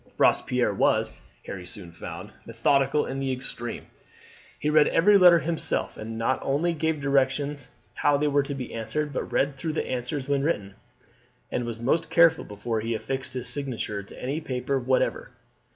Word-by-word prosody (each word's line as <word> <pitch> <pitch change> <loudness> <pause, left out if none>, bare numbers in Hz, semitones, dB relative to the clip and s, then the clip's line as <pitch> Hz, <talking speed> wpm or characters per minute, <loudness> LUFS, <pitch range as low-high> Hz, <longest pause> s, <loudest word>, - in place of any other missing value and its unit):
Robespierre - - +3
was, - - +2 0.3
Harry 90 -2 -7
soon 90 -3 -8
found, 85 - -8 0.2
methodical 140 +1 +2
in 135 - -4
the 135 -1 -1
extreme. 120 -2 -5 0.7
He 150 - -3
read 150 0 +5
every 205 +5 +5
letter 180 -3 +8
himself, 165 0 -2
and 110 +1 -6
not 115 +3 +1
only 155 +6 +1
gave 160 -1 -1
directions 140 0 0 0.2
how 145 -1 +2
they 150 +1 +1
were 145 0 +3
to 140 0 -4
be 130 -3 -6
answered, 130 +7 -3
but - - -3
read 140 0 +1
through 155 +3 -3
the - - -1
answers 130 +2 -3
when 140 -1 +1
written, 105 - -1 0.8
and 125 - -1
was 115 -1 -5
most 135 +8 +1
careful 165 -1 +5
before 110 +2 -3
he 115 +1 -2
affixed 130 +3 -4
his 125 - -4
signature 125 -7 -3
to 100 - -13
any 140 +5 -2
paper 135 -1 -1
whatever. 130 +1 0
135 Hz, 170 wpm, -26 LUFS, 120-150 Hz, 0.8 s, letter